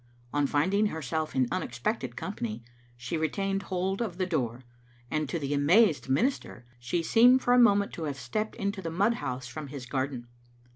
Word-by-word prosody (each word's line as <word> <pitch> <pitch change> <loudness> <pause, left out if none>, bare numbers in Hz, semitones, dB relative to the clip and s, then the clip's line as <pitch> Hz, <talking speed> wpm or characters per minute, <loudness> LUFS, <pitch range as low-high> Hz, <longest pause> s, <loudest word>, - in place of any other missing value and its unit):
On 145 -1 +2
finding 190 +10 +2
herself 160 -2 -3
in 130 -2 +3
unexpected 185 - -2
company 120 - -5 0.3
she 120 +7 -3
retained 195 +5 -1
hold 190 +2 -2
of 195 -7 -3
the 185 - 0
door, 130 -8 -2 0.5
and 155 -2 -1
to - - -1
the 145 -2 -2
amazed 150 - +4
minister 135 - 0
she 125 +8 -1
seemed 245 +8 +5
for 245 - +3
a 250 - +6
moment 205 -4 +4
to 165 - -4
have 140 -2 -3
stepped 215 - -3
into 200 -2 -3
the 165 - -4
mud 200 +8 +2
house 125 - -4
from 145 +4 -7
his 135 -2 -7
garden. 130 -1 -3
160 Hz, 180 wpm, -28 LUFS, 130-200 Hz, 0.5 s, a